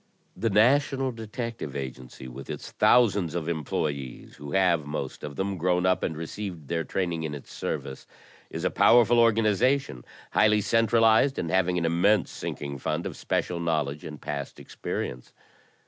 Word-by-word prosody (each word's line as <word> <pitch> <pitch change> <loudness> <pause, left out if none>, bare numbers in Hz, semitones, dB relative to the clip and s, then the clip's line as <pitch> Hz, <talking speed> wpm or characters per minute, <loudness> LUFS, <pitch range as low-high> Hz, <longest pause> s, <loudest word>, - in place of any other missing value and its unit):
"The 115 +4 0
national 135 +5 +3
detective 115 - -6
agency 65 -1 -7
with 60 - -10
its - - -6
thousands 100 -9 +3
of 85 -2 -3
employees 75 -5 -3
who 70 0 -8
have, 90 -5 +3
most 70 -2 -5
of 70 -1 -6
them, 95 +1 -2
grown 90 +1 +1
up 95 0 +2
and 80 - -2
received 85 -1 -6
their 85 -1 0
training 85 -3 -2
in 75 -2 -4
its 70 - -11
service, 65 -1 -5 0.4
is - - -6
a - - +1
powerful 120 0 +5
organization, 115 - +2 0.3
highly 105 0 +4
centralized, 115 +4 +3
and 85 - -2
having 90 -1 +2
an 85 - 0
immense 90 +4 +2
sinking 70 -1 -5
fund 80 +6 -2
of - - -5
special 90 -1 -2
knowledge 75 -3 -1
and 75 -1 -8
past 70 -2 -5
experience. - - -5
90 Hz, 155 wpm, -27 LUFS, 75-110 Hz, 0.4 s, powerful